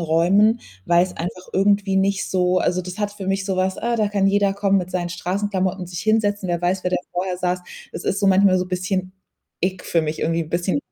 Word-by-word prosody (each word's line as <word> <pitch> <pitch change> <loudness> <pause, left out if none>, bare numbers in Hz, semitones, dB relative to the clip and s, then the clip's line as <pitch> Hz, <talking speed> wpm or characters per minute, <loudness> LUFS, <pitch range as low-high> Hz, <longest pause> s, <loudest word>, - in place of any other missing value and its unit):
Räumen, 185 +8 +3 0.2
weil's 175 +1 +3
einfach 180 +2 -6
irgendwie 195 0 +2
nicht 195 0 +1
so 185 -1 +2
also, 180 +1 0
das 180 +3 -8
hat 205 -1 -1
für 195 -2 -8
mich 195 0 0
so 190 -1 -2
was: 185 0 0
„Äh, 235 0 -1
da 210 -2 +1
kann 200 -1 +1
jeder 200 0 +2
kommen, 200 -1 +2
mit 180 0 -4
seinen 175 -1 -1
Straßenklamotten 190 +1 -2
und 180 - -6
sich 175 -2 -5
hinsetzen. 205 -3 +1
Wer 175 0 -1
weiß, 185 +1 0
wer 180 - 0
da - - +3 0.2
vorher 180 +1 -2
saß.“ 180 0 -1 0.3
Es - - -7
ist 200 - 0
so 200 - +2
manchmal, 190 -1 +5
so 180 - -2
bisschen 185 0 -2 0.5
Ick 185 +1 -2
für 165 - +1
mich, 155 0 -3
irgendwie 165 +1 0
'n 155 - -14
bisschen 175 +8 0
185 Hz, 230 wpm, -22 LUFS, 180-200 Hz, 0.5 s, manchmal